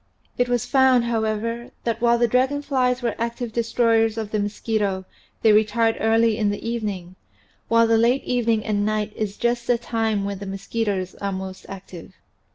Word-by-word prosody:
It 245 0 0
was 245 -2 0
found, 265 -3 +4
however, 230 0 -2
that 230 -1 -2
while 235 0 +4
the 240 0 +3
dragon 260 +5 +1
flies 255 -3 0
were 235 - 0
active 235 0 -3
destroyers 230 -1 +2
of 215 -2 -4
the 215 - 0
mosquito 205 -2 -1 0.4
they 220 -2 +6
retired 225 +2 +3
early 225 0 +2
in 210 -2 +2
the 205 +2 -4
evening, 205 -6 -4 0.5
while 230 0 +4
the 225 0 +3
late 245 +4 +2
evening 230 -3 0
and 205 -2 0
night 215 0 -1
is 210 -2 -3
just 240 0 -1
the 245 - +3
time 225 -3 -1
when 200 -1 -4
the 200 - -7
mosqui 195 +4 -3
toes 190 -3 -2
are 200 0 -1
most 190 0 -7
active. 185 -3 -10
225 Hz, 180 wpm, -23 LUFS, 210-235 Hz, 0.5 s, they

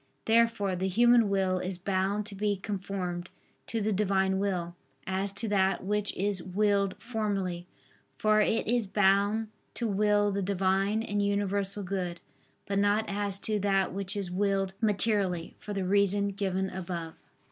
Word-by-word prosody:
Therefore 225 -4 +2
the 185 +2 -1
human 235 +2 +4
will 190 -2 +1
is 185 0 -3
bound 195 +2 -1
to 210 - -8
be 205 +1 0
conformed 185 -3 -4 0.4
to 225 - -2
the 210 +1 0
Divine 190 -1 +1
will, 180 -4 -2 0.3
as 190 +1 -1
to 225 +3 -2
that 190 -2 +1
which 210 +1 0
is 195 -1 0
willed 200 +1 +1
formally, 200 -7 -3 0.5
for 215 0 +3
it 225 +2 +1
is 235 -2 +1
bound 205 +2 +2 0.3
to 235 - -1
will 205 0 +2
the 200 0 -1
Divine 195 +3 +1
and 205 -2 -1
universal 200 0 0
good; 180 -2 -3 0.5
but 200 0 0
not 205 +2 +2
as 200 -1 -1
to 215 -1 0
that 195 -2 +1
which 195 +1 -2
is 190 -3 -4
willed 195 0 0
materially, 200 -5 +1
for 210 - -8
the 195 -2 -2
reason 200 +1 +3
given 190 -1 -2
above. 170 -3 -5
200 Hz, 155 wpm, -29 LUFS, 190-205 Hz, 0.5 s, human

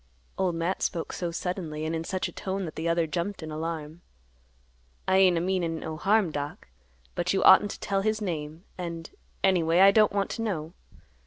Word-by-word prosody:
Old 185 -3 0
Matt 170 +3 -1
spoke 170 -3 -2
so 175 - -3
suddenly 165 -3 -4
and 160 +1 -1
in 160 - -2
such 185 +2 -2
a - - -9
tone 190 0 -3
that 160 - -6
the 165 +1 -2
other 170 0 +2
jumped 175 +3 -3
in 155 - -6
alarm. 160 0 -5 1.1
"I 190 - +4
ain't 185 -3 +5
a - - +2
meanin' 175 -3 -1
no 160 0 -5
harm, 200 +1 +2
Doc; 145 - -5 0.4
but 175 +2 -1
you 195 - +1
oughtn't 195 +2 +7
to - - -7
tell 195 -1 -1
his 215 +1 0
name, 160 -4 -4 0.2
and—anyway 170 0 -1
I 195 +1 +8
don't 215 0 +4
want 200 -1 -1
to 230 - -4
know. 170 -7 -3
175 Hz, 190 wpm, -27 LUFS, 160-190 Hz, 1.1 s, I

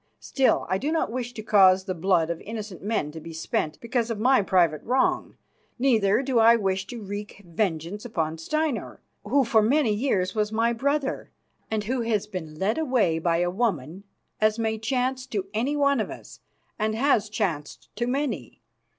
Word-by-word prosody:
Still, 270 -2 +1
I 185 +2 0
do 290 +7 -1
not 320 -8 0
wish 245 0 -3
to 215 - -6
cause 190 -3 +5
the 190 -1 -3
blood 170 -2 +1
of 170 - -5
innocent 215 -4 -7
men 200 -8 -1
to 160 - -8
be 165 +1 -9
spent 155 -1 -2
because 235 0 -1
of 225 -3 -3
my 255 +1 +4
private 175 -6 +2
wrong. 255 +3 0 0.4
Neither 235 -3 +3
do 260 -3 +1
I 230 +1 +7
wish 195 -3 -1
to 235 -3 -7
wreak 205 +1 -7
vengeance 170 +2 -2
upon 165 -9 -2
Steinar, 305 - -2 0.2
who 270 +6 +2
for 225 -2 +3
many 240 +1 +3
years 205 -5 0
was 210 -1 0
my 230 +2 +1
brother, 280 +3 -1 0.4
and 220 -1 -1
who 245 +4 -1
has 220 -3 0
been 180 -7 -7
led 200 - 0
away 240 - +1
by 165 0 +1
a 175 0 +1
woman, 190 - -2 0.4
as 215 0 +2
may 220 -1 -1
chance 255 +2 -1
to 200 -3 -3
any 250 +7 0
one 280 -2 +3
of 215 - -1
us - - -11 0.4
and 215 0 0
has 225 -4 +2
chanced 160 -8 -4
to 240 +2 -1
many. 275 +2 -3
215 Hz, 185 wpm, -25 LUFS, 185-245 Hz, 0.4 s, I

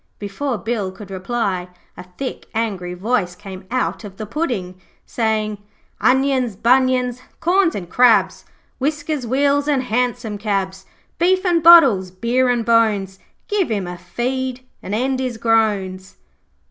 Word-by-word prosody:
Before 230 +6 -3
Bill 215 -4 -3
could 195 0 -12
reply, 190 -2 -2 0.3
a - - -10
thick, 270 -2 -5
angry 195 -6 -2
voice 190 -2 -1
came 190 -1 -10
out 255 -1 -2
of 195 -2 -10
the 215 - -5
pudding, 205 - -3 0.2
saying 215 -2 -1 0.4
'Onions, 260 -3 +2
bunions, 250 +2 +2 0.2
corns 360 0 +2
and 180 -3 -5
crabs, 210 -3 +3 0.4
Whiskers, 290 -1 -2
wheels 280 +3 +2
and 280 -3 +1
hansom 240 -3 -2
cabs, 195 -2 -2 0.3
Beef 370 +2 +2
and 345 -2 +2
bottles, 275 - +7
beer 235 +7 0
and 240 -2 0
bones, 210 -4 +2 0.3
Give 410 - 0
him 205 -4 -1
a 175 0 -6
feed 255 +6 -4 0.2
and 200 - -4
end 260 +3 0
his 255 -3 -3
groans.' 205 -5 0
230 Hz, 135 wpm, -20 LUFS, 195-260 Hz, 0.4 s, bottles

